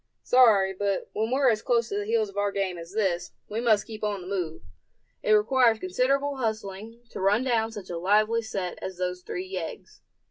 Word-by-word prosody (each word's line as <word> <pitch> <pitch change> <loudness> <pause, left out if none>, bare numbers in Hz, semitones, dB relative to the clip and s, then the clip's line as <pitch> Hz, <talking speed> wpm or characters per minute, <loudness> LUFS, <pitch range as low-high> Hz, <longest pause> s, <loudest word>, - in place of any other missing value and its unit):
"Sorry, 215 -7 +5
but 200 0 -2
when 220 +1 -1
we're 260 0 +3
as 215 -1 -1
close 235 -2 +1
to 200 - -2
the 205 - -4
heels 225 -1 +2
of 200 - -13
our 205 0 0
game 195 -2 -1
as 170 +1 -10
this, 190 -5 -1
we 220 +2 -3
must 220 -4 +3
keep 220 -1 -9
on 205 -2 -1
the 180 - -9
move. 180 -5 -3 0.6
It 215 - +3
requires 230 +2 +4
considerable 270 +9 0
hustling 220 -1 -4
to - - -6
run 205 +5 +3
down 230 -3 +1
such 205 -5 -8
a 170 - -3
lively 215 +5 +3
set 195 -5 -4
as 190 -1 -6
those 180 0 -3
three 180 +1 -5
yeggs. 185 -3 -7
210 Hz, 205 wpm, -27 LUFS, 190-230 Hz, 0.6 s, Sorry